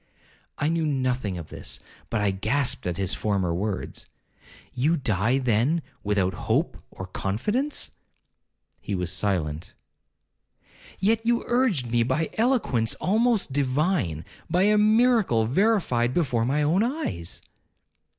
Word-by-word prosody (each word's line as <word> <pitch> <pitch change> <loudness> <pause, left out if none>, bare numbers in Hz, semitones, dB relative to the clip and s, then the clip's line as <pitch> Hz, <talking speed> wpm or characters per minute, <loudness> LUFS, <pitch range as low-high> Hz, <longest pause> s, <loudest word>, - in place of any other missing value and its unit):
I 145 - 0
knew 165 0 +1
nothing 130 -8 -1
of 80 -3 -8
this, - - -5 0.3
but 110 - 0
I 100 -1 +2
grasped 110 +5 -1
at 90 -1 -2
his 95 -1 0
former 95 -2 0
words, 100 +3 -3 0.7
'You 150 +7 +2
die, 110 0 +1
then, 130 +6 +1 0.2
without 100 -3 +1 0.2
hope - - +1
or 95 - -8
confidence?' 210 - -2 0.9
He 100 - -4
was 90 -1 -2
silent. 85 -5 -2 1.2
'Yet 220 +3 +1
you 235 0 +1
urged 225 - +1
me 120 0 +3
by 130 +7 0
eloquence 220 - +1
almost 220 - +1
divine, 135 - 0 0.2
by 180 +2 +3
a 210 +1 +4
miracle 215 - +4
verified 130 - +2
before 125 -9 +1
my 145 +4 +1
own 165 +7 +3
eyes.' 225 - -2
130 Hz, 125 wpm, -25 LUFS, -, 1.2 s, a